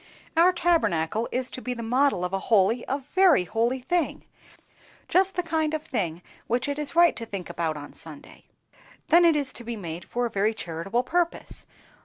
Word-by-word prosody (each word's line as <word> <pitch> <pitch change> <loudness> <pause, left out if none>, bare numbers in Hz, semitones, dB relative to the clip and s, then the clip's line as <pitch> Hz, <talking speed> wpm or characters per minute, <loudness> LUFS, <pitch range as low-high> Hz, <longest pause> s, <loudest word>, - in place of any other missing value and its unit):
"Our 340 +3 +6
Tabernacle 225 - +1
is 255 0 -2
to 255 - -6
be 250 0 -3
the 235 - -6
model 250 -5 +2
of 180 - -5
a 195 - +1
holy—a 235 +6 +2
very 365 - +5
holy 235 +7 -1
thing, 350 +4 -1 0.8
just 380 +1 +2
the 360 - 0
kind 315 -2 0
of 310 - -4
a - - -22
thing 180 - -2 0.2
which 240 +3 0
it 285 +1 -2
is 300 +2 -1
right 345 0 +6
to 230 - -6
think 195 -4 -6
about 160 -2 -2
on 145 0 -9
Sunday. 155 -3 -13 0.6
Then 345 +2 +6
it 330 -2 +5
is 280 -3 -1
to 240 - -8
be 235 0 -5
made 170 -4 -7
for 245 0 -2
a - - -1
very 210 +3 +1
charitable 190 +7 -2
purpose. 345 +3 -2
245 Hz, 195 wpm, -26 LUFS, 195-315 Hz, 0.8 s, Our